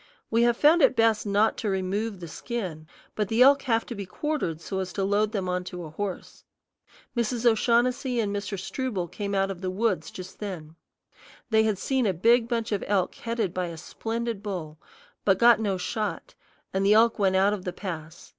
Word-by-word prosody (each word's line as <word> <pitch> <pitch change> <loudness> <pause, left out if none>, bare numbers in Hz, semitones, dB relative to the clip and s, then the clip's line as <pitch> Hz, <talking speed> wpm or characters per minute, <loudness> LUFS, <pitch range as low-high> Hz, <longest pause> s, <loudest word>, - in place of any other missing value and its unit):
We 230 +1 +3
have 240 0 +3
found 320 +3 +5
it 260 - +5
best 225 -2 +2
not 205 +2 +2
to 215 - -2
remove 195 +2 -2
the 170 - -6
skin, 175 -5 -5 0.3
but 210 -2 -1
the 225 +4 +4
elk 280 +1 +6
have 225 -1 +2
to - - -6
be 200 -4 -6
quartered 275 - -2
so 190 +3 -4
as 185 -1 -3
to 195 - -1
load 205 +2 +1
them 195 -4 -2
on 180 0 -1
to 180 -1 -6
a 155 - -8
horse. 195 +3 -6 0.7
Mrs. 235 0 -1
O'Shaughnessy 240 +2 +2
and 205 -2 -1
Mr. 200 0 -3
Struble 205 -4 -3
came 200 +2 -4
out 195 0 +1
of 185 -2 -8
the 185 - -2
woods 185 -5 0
just 185 0 -10
then. 170 -7 -6 0.8
They 220 0 +5
had 215 -3 +1
seen 260 +3 0
a 190 - 0
big 230 +6 +4
bunch 230 -1 -2
of 205 - -1
elk 195 -3 +1
headed 230 -6 -3
by 185 -1 -2
a 170 -1 -7
splendid 225 +5 -4
bull, 170 -7 -5 0.4
but 195 -2 +3
got 235 0 +6
no 200 -4 0
shot, 210 +3 -3 0.4
and 190 +1 +1
the 200 +2 +5
elk 230 +1 +4
went 190 -2 +3
out 195 +2 +4
of 200 -3 -4
the 180 - -3
pass. 165 -4 -7
205 Hz, 205 wpm, -26 LUFS, 185-230 Hz, 0.8 s, elk